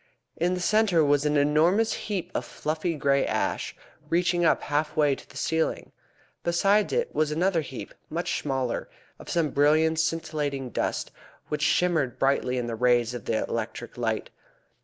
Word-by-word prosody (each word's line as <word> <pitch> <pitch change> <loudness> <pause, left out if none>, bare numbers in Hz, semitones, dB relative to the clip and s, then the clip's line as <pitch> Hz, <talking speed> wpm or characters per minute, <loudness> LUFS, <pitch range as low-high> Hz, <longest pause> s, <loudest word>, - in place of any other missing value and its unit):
In 175 +2 +1
the - - -3
centre 190 -4 +3
was 145 0 +3
an 150 0 +2
enormous 160 +10 +3
heap 185 -4 -4
of - - -1
fluffy 160 +2 -3
grey 140 -1 +2
ash, - - -1 0.3
reaching 175 +1 +2
up 165 - +3
half 150 +2 -1
way 145 -2 +4
to - - -9
the - - -11
ceiling. 160 0 -1 0.5
Beside 195 +5 +2
it 475 0 0
was 155 -1 +1
another 170 +2 +1
heap, 135 -4 -8 0.2
much 170 +3 -2
smaller, 135 -4 -2 0.3
of - - -11
some 165 -4 +1
brilliant 155 +3 +3
scintillating 150 -5 -2
dust, - - -2 0.4
which 150 -1 -2
shimmered 160 -5 +2
brightly 135 -2 +1
in 125 - -1
the 120 - -4
rays 120 0 +2
of 120 - -7
the 110 -1 0
electric 115 +1 -4
light. 110 -3 -2
155 Hz, 160 wpm, -26 LUFS, 135-170 Hz, 0.5 s, way